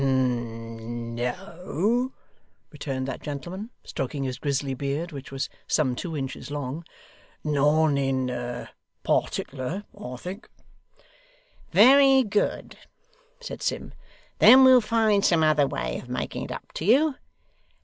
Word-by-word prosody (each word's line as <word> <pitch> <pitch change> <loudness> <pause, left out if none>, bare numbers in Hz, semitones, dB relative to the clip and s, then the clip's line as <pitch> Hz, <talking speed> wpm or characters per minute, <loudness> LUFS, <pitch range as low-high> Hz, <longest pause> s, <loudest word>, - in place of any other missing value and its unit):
'N 120 -3 -2
no,' 180 - -1 0.6
returned 135 -3 -4
that 135 - -5
gentleman, 175 - -6
stroking 135 +1 -4
his 130 -1 -4
grizzly 140 -1 -1
beard, 140 +6 -3
which 140 -2 -9
was 135 0 -2 0.2
some 130 -5 +1
two 165 +2 -4
inches 135 -1 -5
long. 145 +2 -4 0.6
'None 150 0 +3
in 125 -3 -2 0.4
partickler, 140 +9 -1
I 125 +1 -7
think.' 185 - -8 1.2
'Very 265 +7 +7
good,' 210 -2 -1 0.6
said - - -7
Sim; - - -3 0.5
'then 265 +1 +9
we'll 260 -1 +8
find 215 -2 +2
some 165 -2 +4
other 150 -2 +4
way - - -3
of 125 - -12
making 125 - -3
it - - -8
up - - -8
to 160 - -5
you. 280 +8 +4
145 Hz, 120 wpm, -26 LUFS, 130-195 Hz, 1.2 s, then